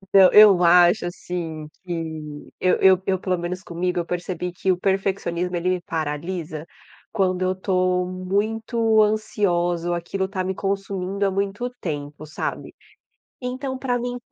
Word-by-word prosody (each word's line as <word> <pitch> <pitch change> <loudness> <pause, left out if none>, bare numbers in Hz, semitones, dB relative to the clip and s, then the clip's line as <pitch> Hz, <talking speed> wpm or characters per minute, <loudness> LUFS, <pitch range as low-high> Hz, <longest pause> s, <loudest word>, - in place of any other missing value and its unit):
Então, 190 -1 +8
eu 200 -4 +8
acho, 175 +3 +5
assim, 165 -3 -5 0.2
que 160 -4 -6
eu 185 - +3
eu 190 -1 +6
eu 190 -2 +1
pelo 185 -1 0
menos 175 +2 -4
comigo 175 +1 -2
eu 170 - -2
percebi 180 0 -4
que 190 +1 0
o 180 - +1
perfeccionismo 185 -2 -1
ele 175 +1 0
me 185 -1 0
paralisa 160 -1 -4 0.5
quando 185 -3 0
eu 185 - +1
estou 185 -1 0
muito 220 +4 +1
ansiosa 175 -5 0
ou 175 - +1
aquilo 190 +3 -3
tá 190 -1 -3
me 190 +1 -2
consumindo 195 0 -2
há 195 - +1
muito 200 +5 -2
tempo, 150 -2 -5
sabe. 155 - -5 0.7
Então 260 +1 -4
pra 250 -2 -1
mim 245 +1 -3
185 Hz, 150 wpm, -23 LUFS, 175-195 Hz, 0.7 s, Então